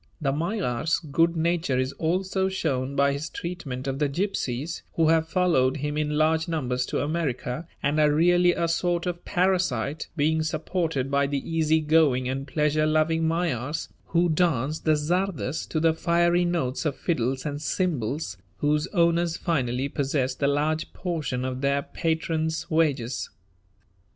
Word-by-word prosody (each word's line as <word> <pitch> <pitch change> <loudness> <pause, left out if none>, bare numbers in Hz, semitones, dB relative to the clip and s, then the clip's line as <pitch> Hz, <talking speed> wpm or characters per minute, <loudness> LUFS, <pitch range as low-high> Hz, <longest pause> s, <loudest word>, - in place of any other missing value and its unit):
The 140 -4 0
Magyar's 160 - 0
good 165 +2 +1
nature 165 -4 +1
is 130 +1 -1
also 190 +3 0
shown 140 -7 -2
by 140 0 +3
his 145 +2 -4
treatment 140 -6 -5
of 135 0 -2
the 150 -2 +1
gypsies, 155 -4 -2
who 160 -1 +3
have 160 0 +3
followed 155 -8 +2
him 150 +1 -3
in 150 0 -1
large 160 +1 +2
numbers 125 -6 -1
to - - -1
America, 150 -1 -2 0.2
and 145 +2 +1
are 150 -1 +5
really 175 +3 +4
a 170 -1 0
sort 170 +1 0
of 175 -1 -3
parasite, 175 -8 0
being 160 +1 +2
supported 155 -3 -1
by 140 0 +2
the 140 -1 -3
easy 160 -1 +2
going 150 -5 +3
and 135 +2 -3
pleasure 150 +1 +1
loving 160 +1 +2
Magyars, 160 -3 -1 0.2
who 170 +1 +2
dance 155 -4 +1
the 155 -1 +2
czardas 165 -1 -1
to 160 - 0
the 165 0 +3
fiery 170 +1 +2
notes 165 -8 -1
of 150 -4 -1
fiddles 130 -5 -1
and 145 -1 -3
cymbals 145 - -2 0.2
whose 150 +1 +1
owners 170 -2 +2
finally 130 -5 0
possess 135 -2 -1
the 140 +2 0
largest 155 +2 0
portion 155 -8 -3
of 130 0 -3
their 140 0 +1
patron's 160 +1 -2
wages. 140 -7 0
155 Hz, 155 wpm, -26 LUFS, 140-170 Hz, 0.2 s, are